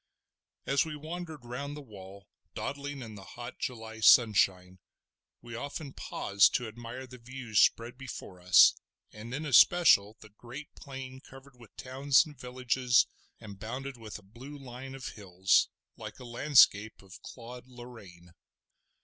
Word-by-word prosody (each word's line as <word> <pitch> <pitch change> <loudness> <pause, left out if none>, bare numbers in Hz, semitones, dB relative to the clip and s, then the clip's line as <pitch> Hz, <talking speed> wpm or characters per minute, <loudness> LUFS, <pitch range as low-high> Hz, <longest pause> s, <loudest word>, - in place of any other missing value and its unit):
As 140 0 +2
we 155 -2 -6
wandered 160 -2 -8
round 140 +4 -6
the - - -8
wall, 100 -4 -13 0.3
dawdling 140 -1 -5
in 110 -2 -9
the 100 -2 -11
hot 120 +4 -10
July 110 -2 -6
sunshine, 95 -5 +4 0.6
we 120 -1 -10
often 140 +3 -6
paused 100 -2 +2
to 125 - -1
admire 120 +3 -8
the 125 0 -13
views 120 -2 -2
spread 120 +2 +2
before 105 -8 -9
us, 90 0 +7 0.4
and 110 +2 -9
in 145 +5 -4
especial 130 - +5
the 110 - -15
great 120 +7 -11
plain 130 -1 -9
covered 135 0 -16
with 120 -3 -18
towns 135 +3 +2
and 150 -2 -12
villages 125 -1 +1 0.3
and 100 -3 -11
bounded 130 +6 -6
with 110 -3 -9
a 105 - -17
blue 125 +9 -11
line 135 0 -9
of 135 - -6
hills, 95 -2 +1 0.3
like - - -9
a 125 - -11
landscape 120 -5 +3
of 95 +1 -14
Claude 125 +1 -11
Lorraine. 110 -9 -13
120 Hz, 150 wpm, -30 LUFS, 110-135 Hz, 0.6 s, us